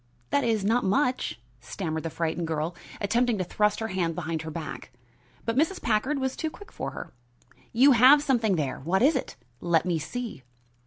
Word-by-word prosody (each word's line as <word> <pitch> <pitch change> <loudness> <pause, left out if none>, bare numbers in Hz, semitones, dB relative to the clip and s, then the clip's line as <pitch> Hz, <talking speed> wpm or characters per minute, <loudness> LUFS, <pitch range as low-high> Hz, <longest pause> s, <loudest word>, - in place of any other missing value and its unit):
that 285 - +2
is, 220 -4 +1
not 230 +4 +2
much," 250 - 0 0.2
stammered 160 - -4
the 165 - -4
frightened 165 +1 -2
girl, 160 +1 -2 0.2
attempting 235 +2 +1
to 185 - -1
thrust 210 +3 +1
her 225 0 -3
hand 170 -4 -1
behind 160 0 -3
her 160 - -6
back. 160 -5 -7 0.5
But 230 - -1
Mrs. 325 +7 +1
Packard 235 +7 0
was 265 -1 -2
too 315 - -2
quick 410 +8 -14
for - - -4
her. - - -9 0.6
"You 265 +5 +6
have 265 +4 +7
something 235 -8 +2
there! 140 -6 -2
What 180 - +1
is 300 +4 +5
it? - - -3 0.2
Let 170 -1 +2
me 175 -3 0
see." 205 - -5
210 Hz, 190 wpm, -27 LUFS, 165-250 Hz, 0.6 s, have